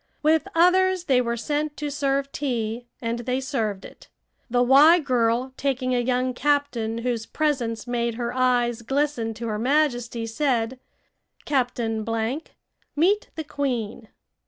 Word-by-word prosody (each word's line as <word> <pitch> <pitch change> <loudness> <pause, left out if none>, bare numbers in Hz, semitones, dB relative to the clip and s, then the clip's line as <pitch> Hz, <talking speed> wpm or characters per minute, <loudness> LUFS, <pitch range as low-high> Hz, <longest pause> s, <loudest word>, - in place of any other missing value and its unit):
With 315 +4 +3
others 370 +1 +4
they 265 -7 +3
were 235 -1 -2
sent 295 +4 -2
to 295 -1 -3
serve 275 -1 -1
tea, 240 -3 -3 0.2
and 230 +1 -2
they 250 +2 -1
served 225 -8 -2
it. - - -14 0.4
The 245 +1 +3
"Y" 285 +7 +7
girl, 250 -2 0
taking 260 -2 -1
a 245 - +2
young 250 +1 0
captain 250 -5 0
whose 235 -3 -1
presence 255 -8 -1
made 235 -1 -1
her 240 0 -3
eyes 245 -2 +1
glisten 260 -3 -1
to 230 +1 -6
her 210 -1 -2
Majesty, 245 -3 +1
said: 240 0 -1 0.7
"Captain 240 -5 -1
Blank, 230 +7 -3 0.4
meet 380 +8 +2
the 320 - -4
queen." 245 -7 -3
250 Hz, 140 wpm, -24 LUFS, 230-285 Hz, 0.7 s, Y